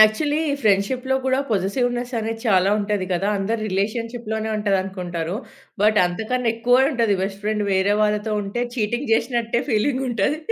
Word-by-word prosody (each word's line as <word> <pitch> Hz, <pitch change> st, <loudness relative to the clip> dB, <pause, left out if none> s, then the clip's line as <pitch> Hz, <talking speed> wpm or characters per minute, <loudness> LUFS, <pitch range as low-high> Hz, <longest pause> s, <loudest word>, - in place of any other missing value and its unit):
Actually 290 Hz, +9 st, +4 dB, 0.2 s
ఫ్రెండ్‌షిప్‌లో 245 Hz, +6 st, +1 dB
గూడా 260 Hz, 0 st, +2 dB
positiveness 245 Hz, +5 st, 0 dB
అనేది 225 Hz, +1 st, -3 dB
చాలా 190 Hz, -1 st, +4 dB
ఉంటది 205 Hz, -2 st, -1 dB
గదా! 195 Hz, +3 st, 0 dB
అందరు 220 Hz, +4 st, -1 dB
రిలేషన్‌షిలోనే 220 Hz, +2 st, -2 dB
ఉంటదనుకుంటారు. 185 Hz, -3 st, -2 dB, 0.5 s
బట్ 215 Hz, 0 st, +4 dB
అంతకన్నా 225 Hz, +6 st, -1 dB
ఎక్కువే 245 Hz, +3 st, +3 dB
ఉంటది 230 Hz, -6 st, +1 dB
బెస్ట్ 195 Hz, +1 st, -4 dB
ఫ్రెండ్ 210 Hz, -1 st, 0 dB
వేరే 190 Hz, +2 st, +2 dB
వాళ్ళతో 210 Hz, +1 st, 0 dB
ఉంటే 205 Hz, +5 st, -3 dB
చీటింగ్ 240 Hz, +4 st, -1 dB
చేశినట్టే 235 Hz, 0 st, 0 dB
ఫీలింగుంటది. 250 Hz, +2 st, 0 dB
215 Hz, 130 wpm, -22 LUFS, 200-240 Hz, 0.5 s, Actually